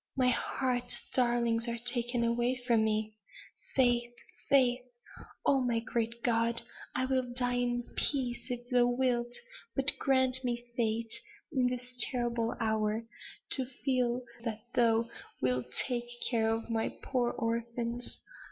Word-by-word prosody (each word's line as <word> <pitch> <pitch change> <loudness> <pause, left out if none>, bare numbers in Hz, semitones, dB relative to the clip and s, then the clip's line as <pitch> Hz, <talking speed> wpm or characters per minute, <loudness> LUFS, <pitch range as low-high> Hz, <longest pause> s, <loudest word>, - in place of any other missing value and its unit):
"My 255 -1 +4
heart's 250 0 0
darlings 235 -2 +2
are 235 0 -1
taken 240 0 0
away 240 +2 +2
from 230 -3 +4
me. 215 0 0 0.6
Faith! 240 -2 +3 0.3
faith! 255 -2 +5 0.6
Oh, 275 -1 +4
my 235 -2 +1
great 235 0 -2
God! 230 0 +2 0.3
I 255 - +2
will 260 -2 0
die 245 -1 +1
in 245 0 0
peace, 255 -4 -1
if 245 -1 -4
Thou 245 -1 +5
wilt 245 -1 +1 0.4
but 270 0 +3
grant 260 -1 +3
me 240 -1 -2
faith 225 -1 0 0.4
in 260 -5 +2
this 250 0 +2
terrible 240 -2 -1
hour, 220 0 0 0.5
to 265 - +3 0.2
feel 250 -2 +1 0.2
that 220 -2 -4
Thou 230 -1 +3 0.3
wilt 125 -1 +1 0.2
take 240 -2 -2 0.2
care 225 -2 +2
of 225 0 -1
my 225 -1 +1
poor 245 -3 -1
orphans. 235 +1 -2
240 Hz, 135 wpm, -32 LUFS, 230-250 Hz, 0.6 s, faith